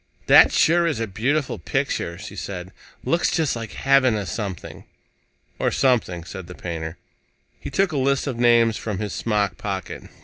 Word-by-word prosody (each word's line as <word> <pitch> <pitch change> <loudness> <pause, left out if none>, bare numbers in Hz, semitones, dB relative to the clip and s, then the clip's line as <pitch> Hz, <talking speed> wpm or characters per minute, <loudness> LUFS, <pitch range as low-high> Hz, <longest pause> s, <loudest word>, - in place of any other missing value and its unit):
"That - - +7
sure 170 +1 +3
is 155 -8 -1
a 115 - 0
beautiful 130 +8 -1
picture," 135 -11 -2
she 100 +1 -9
said. 90 0 -6 0.3
"Looks 170 +1 +1
just 160 -7 0
like 115 -1 -6
heaven 135 -3 +3
or 105 -2 -3
something." 100 -1 -6 0.7
"Or - - +2
something," 115 -10 +1
said 95 +1 -8
the 90 - -10
painter. 80 -1 -5 0.6
He - - -7
took 195 -1 +1
a 150 - -2
list 140 0 +1
of 130 -5 -4
names 115 -2 +4
from 105 -4 -4
his 105 0 -4
smock 105 -5 -1
pocket. 95 -3 -5
115 Hz, 170 wpm, -23 LUFS, 95-135 Hz, 0.7 s, That